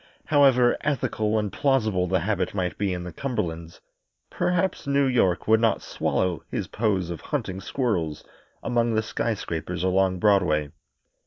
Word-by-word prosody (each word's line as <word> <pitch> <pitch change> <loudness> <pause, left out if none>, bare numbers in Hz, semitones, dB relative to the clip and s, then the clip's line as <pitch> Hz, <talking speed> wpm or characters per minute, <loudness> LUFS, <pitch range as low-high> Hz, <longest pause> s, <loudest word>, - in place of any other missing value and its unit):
However 135 -5 +4
ethical 115 -7 0
and 105 -3 -2
plausible 110 -10 +1
the 95 -1 +1
habit 95 0 -1
might 90 -3 -1
be 100 -1 -1
in 90 -1 -3
the 90 -2 -7
Cumberlands, 85 -11 -4 0.5
perhaps 180 -2 -1
New 140 0 +3
York 120 -9 +1
would 110 0 +5
not 115 -1 +1
swallow 90 -3 -1
his - - -3
pose 100 -6 -1
of 85 - -6
hunting 95 0 -3
squirrels 90 - -2 0.4
among 120 -2 +1
the 110 - +1
skyscrapers 90 -7 -3
along 95 0 +2
Broadway. 80 -7 +2
100 Hz, 145 wpm, -25 LUFS, 90-120 Hz, 0.5 s, would